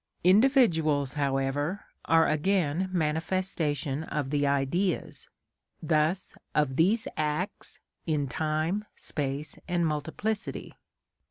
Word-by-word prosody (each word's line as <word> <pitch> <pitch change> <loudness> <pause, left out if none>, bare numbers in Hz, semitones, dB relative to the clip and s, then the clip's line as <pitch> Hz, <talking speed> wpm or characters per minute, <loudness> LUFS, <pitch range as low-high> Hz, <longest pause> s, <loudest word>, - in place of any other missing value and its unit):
Individuals, 175 - +4
however, 140 +5 -1 0.2
are 165 0 +4
again 180 +1 +1
manifestations 160 -3 -1
of 145 -3 -2
the 145 -1 +2
Ideas, 140 +7 -1 0.5
thus 155 +4 0 0.2
of 150 -3 +2
these 200 - +3
acts, 155 +6 -3 0.3
in 150 -3 +1
time, 155 +8 -1
space, 140 0 -3
and 175 -2 +1
multiplicity. 160 +8 -3
155 Hz, 90 wpm, -28 LUFS, 145-185 Hz, 0.5 s, Individuals